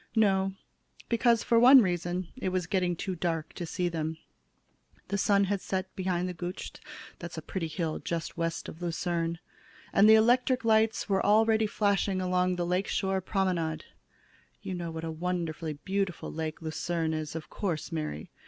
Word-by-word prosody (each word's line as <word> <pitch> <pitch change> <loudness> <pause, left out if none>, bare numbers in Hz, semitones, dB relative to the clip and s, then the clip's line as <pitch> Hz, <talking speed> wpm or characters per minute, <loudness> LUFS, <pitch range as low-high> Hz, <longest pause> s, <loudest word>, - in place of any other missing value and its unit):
"No, 195 -3 +3 0.6
because, 235 0 +3
for 230 -1 +4
one 255 +1 +9
reason, 175 -1 -2
it 245 -7 -2
was 185 -1 -1
getting 180 -1 0
too 190 +3 -3
dark 165 -2 -2
to 175 - -5
see 180 +2 -1
them. 160 -2 -3 0.9
The 200 - 0
sun 200 0 +4
had 200 0 -1
set 190 0 -3
behind 180 -1 -1
the 180 - -4
Gutsch 175 +2 -6 0.5
that's - - -7
a - - -3
pretty 180 -4 -3
hill 160 0 -3
just 170 -1 -4
west 165 0 -2
of 160 - -9
Lucerne 170 -1 -1 0.6
and 205 +2 +6
the 220 - +9
electric 245 +3 +3
lights 220 0 +3
were 195 -2 +1
already 220 +1 +4
flashing 200 -2 +1
along 180 0 +1
the 175 -1 -1
lake 180 +3 0
shore 190 -1 0
promenade. 180 -5 -1 0.8
You 190 - -4
know 175 -2 -4
what 160 0 -6
a 165 - -3
wonderfully 165 -1 -3
beautiful 190 +4 -3
lake 160 0 -4
Lucerne 160 0 -1
is, 155 0 -4
of 160 - -7
course, 175 -5 -3
Mary?" 150 - -4
180 Hz, 170 wpm, -29 LUFS, 165-200 Hz, 0.9 s, one